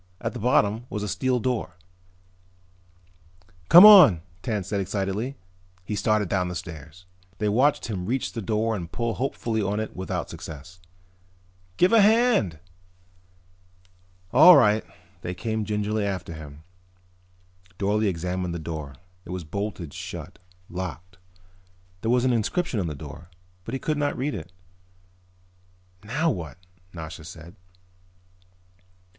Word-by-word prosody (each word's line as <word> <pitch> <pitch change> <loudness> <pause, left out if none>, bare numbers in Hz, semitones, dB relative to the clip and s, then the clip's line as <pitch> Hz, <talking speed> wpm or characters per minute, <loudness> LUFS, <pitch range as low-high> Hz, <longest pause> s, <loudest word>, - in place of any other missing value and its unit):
At 115 - -3
the 125 - -6
bottom 115 0 +1
was 105 -1 -4
a - - -3
steel 130 +4 0
door. 125 -4 -2 1.9
"Come 175 +4 +11
on," 180 - +9 0.2
Tance 105 -5 -3
said 100 -2 -1
excitedly. 100 +7 -3 0.5
He 105 - -3
started 110 -1 +1
down 90 -1 0
the 90 - -5
stairs. 80 +1 -9 0.3
They 105 - -1
watched 130 +8 +2
him 95 -5 -4
reach 130 +3 -2
the 115 - -4
door 110 +2 0
and 85 -4 -6
pull 115 -1 -2
hopefully 115 -3 -2
on 100 +1 -1
it 110 - -5
without 95 0 -4
success. 80 +4 -10 1.0
"Give 180 +4 +4
a 225 - +7
hand!" 215 - +3 1.8
"All 160 +8 +9
right." 105 -1 +4 0.4
They 90 +1 -5
came 110 +2 -3
gingerly 105 +1 -1
after 95 -4 -3
him. 75 -1 -11 1.1
Dorle 105 +2 +1
examined 90 0 -3
the - - -2
door. 80 -4 -6 0.3
It - - -15
was 90 -1 -4
bolted 90 -2 -5
shut, - - -8 0.3
locked. 90 +1 -7 0.8
There 115 - -2
was 125 +1 +3
an 125 - +3
inscription 120 - -1
on 90 - -1
the 75 - -4
door 75 +3 -10 0.4
but 115 - -6
he - - -3
could 155 +1 -2
not 145 0 -1
read 140 +3 -2
it. 85 -2 -7 1.5
"Now 150 +10 0
what?" 80 - -6 0.3
Nasha 80 -2 -8
said. 85 +2 -11
105 Hz, 135 wpm, -25 LUFS, 90-120 Hz, 1.9 s, Come